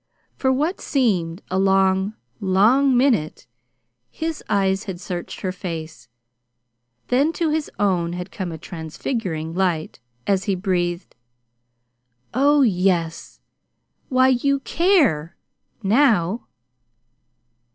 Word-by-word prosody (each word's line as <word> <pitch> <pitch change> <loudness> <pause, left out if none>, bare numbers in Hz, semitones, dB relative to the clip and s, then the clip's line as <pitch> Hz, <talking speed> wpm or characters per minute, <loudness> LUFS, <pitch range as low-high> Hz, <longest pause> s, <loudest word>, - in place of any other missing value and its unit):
For 265 - +1
what 300 +8 -1
seemed 190 - 0
a 190 - +1
long, 190 +1 +2 0.2
long 230 +8 +4
minute 240 - +1 0.6
his 320 -1 -4
eyes 195 0 +1
had 190 -4 -6
searched 180 -2 -6
her 185 - -1
face; 165 - -7 1.0
then 275 +6 +3
to 335 -2 0
his 310 -1 -1
own 180 -4 +1
had 180 +1 -6
come 185 -3 -4
a 160 - -6
transfiguring 160 - -4
light, 175 -6 -1 0.3
as 195 -1 +1
he 200 -3 +1
breathed: 180 -2 -2 1.2
"Oh, 285 +3 +4
yes! 180 -6 0 0.7
Why, 255 0 +4
you 275 +2 +1
CARE, 290 - +2 0.5
now!" 215 -3 +2
195 Hz, 105 wpm, -22 LUFS, 175-260 Hz, 1.2 s, long